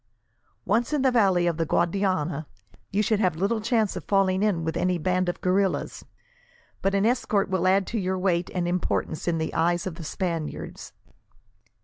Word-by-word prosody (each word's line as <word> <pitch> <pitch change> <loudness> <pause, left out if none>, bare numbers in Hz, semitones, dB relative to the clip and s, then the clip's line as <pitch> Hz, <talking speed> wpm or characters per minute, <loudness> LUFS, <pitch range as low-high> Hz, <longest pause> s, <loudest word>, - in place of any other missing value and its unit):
Once 230 +8 +1
in 290 -3 +1
the 260 - +4
valley 195 -7 +3
of 170 -2 0
the 165 - +1
Guadiana, 170 -4 0 0.4
you 205 +2 +1
should 220 -2 +1
have 185 -6 +2
little 200 +6 0
chance 220 -2 +1
of - - -5
falling 195 -1 +2
in 200 -6 +1
with 160 0 -2
any 180 0 +1
bands 185 +2 0
of 175 - -5
guerrillas, 190 +1 0 0.8
but 195 0 +1
an 200 +1 +2
escort 220 -4 +1
will 185 -1 +1
add 190 +1 +3
to 230 - -3
your 185 -1 -1
weight 180 -2 0
and 175 -1 0
importance 175 -2 -2
in 170 -1 +1
the 160 0 -3
eyes 175 +1 +1
of 185 - -3
the 170 - -7
Spaniards." 165 -1 -4
185 Hz, 185 wpm, -25 LUFS, 175-200 Hz, 0.8 s, the